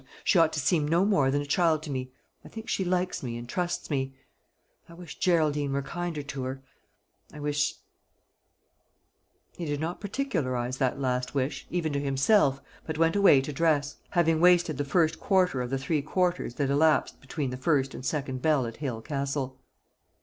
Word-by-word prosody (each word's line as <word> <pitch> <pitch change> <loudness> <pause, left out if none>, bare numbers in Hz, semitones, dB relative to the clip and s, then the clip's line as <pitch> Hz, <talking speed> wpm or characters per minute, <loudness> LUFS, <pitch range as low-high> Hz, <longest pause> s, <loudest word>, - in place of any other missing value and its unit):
She 180 - +4
ought 165 -1 +5
to 155 - -1
seem 150 +1 +2
no 170 +5 +3
more 190 -10 +3
than 145 +1 0
a - - -8
child 160 +1 +2
to 155 - -6
me. 130 -1 -4 0.3
I - - -12
think 220 -1 -9
she 190 - 0
likes 180 0 -1
me, 120 -3 -4
and 120 0 -8
trusts 175 +4 -3
me. 135 -1 -1 0.7
I 170 - -12
wish 175 -3 -10
Geraldine 150 -5 +2
were 140 0 -1
kinder 170 0 -4
to 140 -1 -6
her; 135 +1 -5 0.7
I 150 - -10
wish 145 0 0 0.9
" - - -46
He 170 - -3
did 145 -2 -2
not 165 +3 -4
particularise 130 - -2
that 130 0 0
last 125 0 -1
wish, 135 +1 -2
even 165 -4 -1
to 140 - 0
himself, 135 +2 +3 0.3
but 160 -1 -3
went 165 +2 +3
away 200 -9 +6
to 145 +2 -5
dress, 145 -1 +1
having 165 -2 +2
wasted 175 -4 +4
the 145 - 0
first 160 +2 +2
quarter 185 -9 +2
of 125 - -3
the 135 - -1
three 150 +3 -1
quarters 175 -4 -1
that 140 -2 0
elapsed 155 +2 +2
between 135 0 -3
the - - -4
first 135 0 +1
and - - -8
second 135 -1 -2
bell 150 -4 +2
at 115 -1 -7
Hale 125 -7 -4
Castle. 140 -2 -3
145 Hz, 190 wpm, -28 LUFS, 135-170 Hz, 0.9 s, away